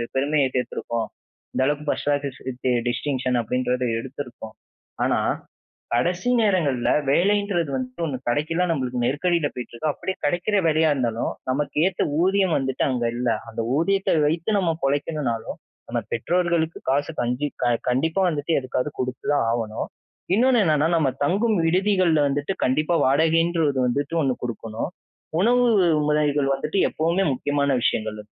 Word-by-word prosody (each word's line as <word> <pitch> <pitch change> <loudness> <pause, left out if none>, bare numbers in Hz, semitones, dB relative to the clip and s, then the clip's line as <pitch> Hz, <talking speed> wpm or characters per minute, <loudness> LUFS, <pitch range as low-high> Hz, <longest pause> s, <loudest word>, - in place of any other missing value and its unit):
பெருமைய 140 +1 +2
சேர்த்துருக்கோம். 115 -2 -2 0.5
இந்த - - +1
அளவுக்கு 150 +1 -1
ஃபர்ஸ்ட் - - -1
கிளாஸ் 145 -2 -1
வித் 130 0 -4 0.2
டிஸ்டிங்ஷன் 130 -1 -1
அப்பிடின்றத 125 +2 -1
எடுத்திருக்கோம். 125 -4 -8 0.5
ஆனா, - - +2 0.7
கடைசி 175 - +1
நேரங்கள்ல 170 - +1 0.2
வேலைன்றது 195 -1 +2
வந்து 130 +4 -4
ஒண்ணு 140 - -3
கிடைக்கல. 155 +8 0
நம்மளுக்கு 130 -5 -1
நெருக்கடில 150 +4 +1
போயிட்டிருக்கு. 125 +4 -5
அப்பிடியே 190 +6 -4
கிடைக்கிற 175 +7 +1
வேலையா 160 0 +3
இருந்தாலும், 120 -5 -1 0.2
நமக்கு 145 +3 -2
ஏத்த 190 -1 0 0.2
ஊதியம் 190 -1 +2
வந்துட்டு 130 -1 -1
அங்க 125 -3 -1
இல்ல. 120 +1 -1 0.2
அந்த 115 0 -5 0.2
ஊதியத்த 195 +3 +2
வைத்து 170 +7 +1
நம்ம 180 -4 +2
பொழைக்கணுனாலும், 135 -4 -1 0.3
நம்ம - - -1
பெற்றோர்களுக்கு 170 +4 0
காசு, 145 +4 +1
கஞ்சி 125 +4 -1 0.2
க 120 - +3 0.2
கண்டிப்பா 160 +9 +1
வந்துட்டு 155 -1 -1
எதுக்காவது 130 +1 -2
கொடுத்துதான் 130 +1 -1
ஆவணும். 110 -2 -3 0.5
இன்னொன்னு 250 +1 +4
என்னன்னா, 155 -2 +2
நம்ம 140 -5 +2
தங்கும் 205 +8 +2
விடுதிகள்ல 180 -4 +3
வந்துட்டு 145 +6 -1
கண்டிப்பா 155 +6 +1
வாடகைன்ற 165 +4 +3
ஒண்ணு 130 -2 +1
வந்துட்டு 145 +6 -1
ஒண்ணு 130 - +1
கொடுக்கணும். 115 +1 -4 0.5
உணவு 245 +5 +4 0.4
முறைகள் 145 -2 +2
வந்துட்டு 150 +7 -1
எப்பவுமே 170 +5 +1
முக்கியமான 140 0 0
விஷயங்கள். 110 -1 -1
145 Hz, 135 wpm, -23 LUFS, 125-170 Hz, 0.7 s, இன்னொன்னு